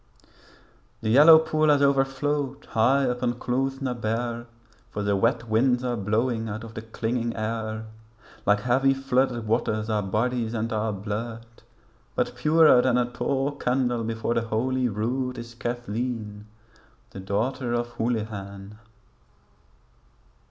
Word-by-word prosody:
The 110 - +1
yellow 150 +6 +9
pool 155 -1 +1
has 145 -1 +4
overflowed 140 0 0
high 130 +4 +3
up 125 0 -2
on 120 - 0
Clooth 135 +2 -2
na 130 -2 -1
Bare, 120 +1 -3 0.4
For 105 - -4
the 100 0 +1
wet 115 +3 +1
winds 125 +3 +2
are 125 -1 -1
blowing 110 +2 -1
out 110 +2 -5
of 115 -1 -9
the 110 - -6
clinging 115 +1 -3
air; 110 0 -3 0.6
Like 105 0 +3
heavy 135 +3 +3
flooded 130 -3 0
waters 110 -1 0
our 105 -1 +1
bodies 115 +3 -1
and 115 +1 -2
our 110 0 0
blood; 110 +3 -5 0.7
But - - -1
purer 155 -4 +5
than 125 -1 +2
a 120 0 0
tall 135 +2 -1
candle 125 -3 0
before 115 +1 -2
the 115 - +1
Holy 125 +3 0
Rood 125 +5 -2
Is 115 0 -8
Cathleen 115 -3 -4 0.6
the - - -8
daughter 115 +6 -2
of 120 0 -1
Houlihan. 105 -3 -4
120 Hz, 140 wpm, -25 LUFS, 110-130 Hz, 0.7 s, yellow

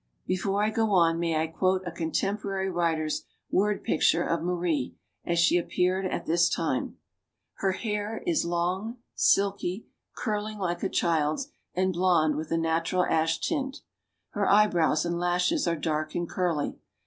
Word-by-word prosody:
Before 195 +2 0
I 215 - +1
go 220 -1 +1
on, 165 -2 +4
may 165 -2 0
I 160 - +1
quote 185 +3 0
a 175 - -4
contemporary 195 +3 -2
writer's 165 -3 0 0.3
word 205 +2 +1
picture 165 +2 +2
of 165 -1 -1
Marie, 170 -6 -1 0.3
as 170 - 0
she 170 +1 +4
appeared 185 +2 0
at - - -3
this 170 +1 +3
time? 160 -6 -2 0.6
Her 195 -1 +1
hair 210 +1 -3
i 345 - +2
long, 180 +7 -2 0.2
silky, 200 0 +1 0.3
curling 215 -1 -3
like 175 -3 -2
a 195 - 0
child's, 165 - 0 0.2
and 185 +1 +1
blond 170 -4 +3
with 155 +1 -4
a 165 - +2
natural 165 +2 +1
ash 160 0 +1
tint.... 275 -4 -2 0.5
Her 205 -1 0
eyebrows 175 -7 +4
and 170 0 -1
lashes 180 - +1
are 170 - +2
dark 155 -1 -2
and 175 0 -1
curly. 170 -6 -1
175 Hz, 155 wpm, -27 LUFS, 165-200 Hz, 0.6 s, on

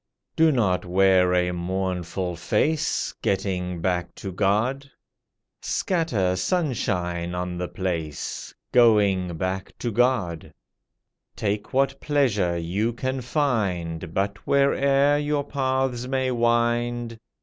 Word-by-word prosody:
Do 160 0 +5
not 105 -9 +1
wear 95 0 +4
a 90 0 +2
mournful 90 0 -3
face 110 - 0
Getting 90 -3 -1
back 90 -1 -1
to 95 - -6
God; 110 +9 0 0.7
Scatter 120 - 0
sunshine 90 - -1
on 90 0 -3
the 90 - -2
place 85 -6 -4 0.2
Going 100 -7 +4
back 95 +2 -3
to 120 - -3
God; 110 -8 0 0.8
Take 105 0 -2
what 135 +1 +1
pleasure 110 - +1
you 95 +8 -1
can 130 +2 -3
find, 95 - -1
But 100 +3 -1
where'er 140 +1 +3
your 145 -1 0
paths 130 -3 -1
may 130 -1 0
wind. 120 0 0
105 Hz, 105 wpm, -24 LUFS, 90-130 Hz, 0.8 s, Do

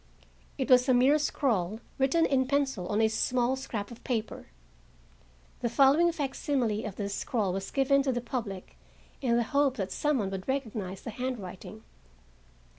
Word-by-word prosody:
It 265 - -1
was 250 +1 +6
a 255 - +5
mere 270 +5 +5
scrawl 220 -9 0 0.2
written 300 +5 +3
in 260 -3 +2
pencil 270 -9 0
on 210 +3 +1
a 220 - +5
small 245 +3 +1
scrap 220 -6 -5
of 235 - -12
paper. 225 -4 -3 1.1
The 235 - -1
following 280 +8 +5
facsimile 270 -7 -1
of 205 -3 -5
the 205 - -3
scrawl 200 -1 -1
was 195 0 -4
given 275 0 +3
to 270 -1 0
the 245 - -1
public 220 - -5 0.4
in 240 -3 +2
the 240 - +2
hope 280 +1 +1
that 195 -3 -3
some 295 -1 +1
one 200 -5 -2
would 190 -1 -5
recognize 220 -8 -3
the 230 - -6
handwriting. 215 -4 -6
245 Hz, 165 wpm, -29 LUFS, 210-270 Hz, 1.1 s, was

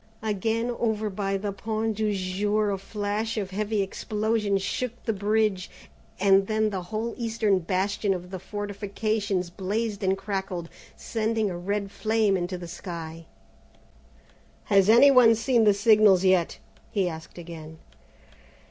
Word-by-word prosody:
Again 220 +3 -1
over 220 -2 0
by 195 0 -1
the 200 +1 -3
Point 220 +2 -2
du 215 -1 +1
Jour 205 +2 0
a 195 - -2
flash 210 +3 -3
and 200 -3 -1
heavy 210 +1 0
explosion 210 +1 -1
shook 240 +5 -3
the 225 - +1
bridge, 210 -2 0 0.5
and 195 0 +4
then 215 0 +1
the 190 -2 -3
whole 220 +6 -4
eastern 220 -4 +1
bastion 195 +3 -1
of 180 -1 -4
the 190 - -5
fortifications 205 -1 -3
blazed 205 +3 -3
and 190 0 +2
crackled, 190 -4 -4 0.3
sending 220 -2 -1
a - - -4
red 200 +2 -2
flame 220 -2 +1
into 180 0 -2
the 175 -1 -8
sky. 165 -2 -7 1.5
"Has 195 0 +5
any 240 +5 +8
one 240 -4 +7
seen 230 0 +2
the 205 - +6
signals 205 -3 +5
yet?" 185 -3 +2 0.3
he 195 -3 0
asked 160 0 -8
again. 160 -2 -9
205 Hz, 140 wpm, -26 LUFS, 190-220 Hz, 1.5 s, any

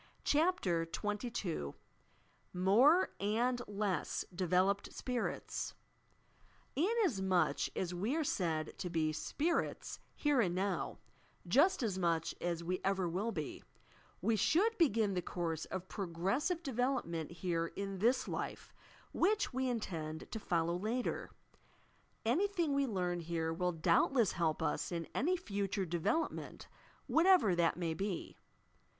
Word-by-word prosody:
CHAPTER 290 - +2
XXII 205 - -3 0.8
MORE 240 - +5
AND 235 +5 +1
LESS 205 -2 -1
DEVELOPED 185 +2 +1
SPIRITS 250 -2 -3 1.0
i 285 - +1 0.2
Inasmuch 190 - +2
as 180 -1 -1
we 205 - -1
are 320 - +1
said 165 - -1
to 185 - -3
be 160 -2 0
"spirits" 310 - -1 0.2
here 290 -4 +3
and 180 -5 +1
now, 195 +2 -1 0.2
— - - -26
just 335 -2 +5
as 195 -5 -1
mucli 165 -2 +1
as 170 -1 -1
we 180 +2 -2
ever 190 -2 +1
will 195 +7 -1
be, - - -5 0.3
— - - -29
we 225 - +3
should 340 - +3
begin 225 - +3
the 180 - 0
course 165 -2 -3
of 185 0 -5
progressive 200 - -1
development 245 - -1
here 170 -2 -1
in 195 -1 -4
this 235 +6 +2
life, - - -5 0.4
which 415 -3 +2
we 260 0 0
intend 160 -9 -4
to 220 - -3
follow 170 -3 0
later. 220 +7 -2 1.0
Anything 340 - +1
we 275 -1 +2
learn 180 -5 -1
here 165 -1 -2
will 180 +2 0
doubtless 180 +7 +3
help 165 -2 0
us 150 - -1
in 170 -2 -3
any 360 +8 +1
future 200 - -2
development 175 - -2 0.4
what 330 +3 +3
ever 360 - +6
that 170 -1 +2
may 170 -2 -1
be. 195 +1 -3
195 Hz, 130 wpm, -35 LUFS, 175-255 Hz, 1.0 s, ever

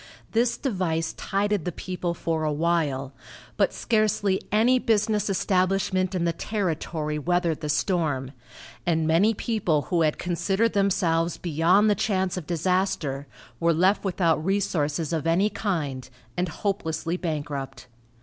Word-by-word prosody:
This 235 +1 +2
device 175 - -1
tided 200 -2 -1
the 180 - -2
people 180 0 -4
for 165 -1 -2
a 155 - +1
while, 150 -4 0 0.4
but - - +2
scarcely 210 -3 +1
any 235 +5 +4
business 215 -2 +1
establishment 185 0 +1
in 175 -2 0
the 170 - +1
territory 160 -6 -2
weathered 170 0 0
the 150 - -3
storm, 150 -5 0 0.5
and 160 -2 +1
many 180 +8 +3
people 190 - 0
who 170 - +3
had 155 -2 +2
considered 190 +6 0
themselves 175 -4 +1
beyond 175 +5 +3
the 210 - +5
chance 195 -3 0
of 175 -5 -6
disaster 170 -5 0 0.3
were 170 -1 +3
left 185 +5 +3
without 170 -5 +1
resources 165 -5 0
of 160 -1 -1
any 190 +6 +3
kind 145 - -3 0.3
and 180 0 -1
hopelessly 165 -3 -2
bankrupt. 145 -6 -4
175 Hz, 135 wpm, -25 LUFS, 160-195 Hz, 0.5 s, the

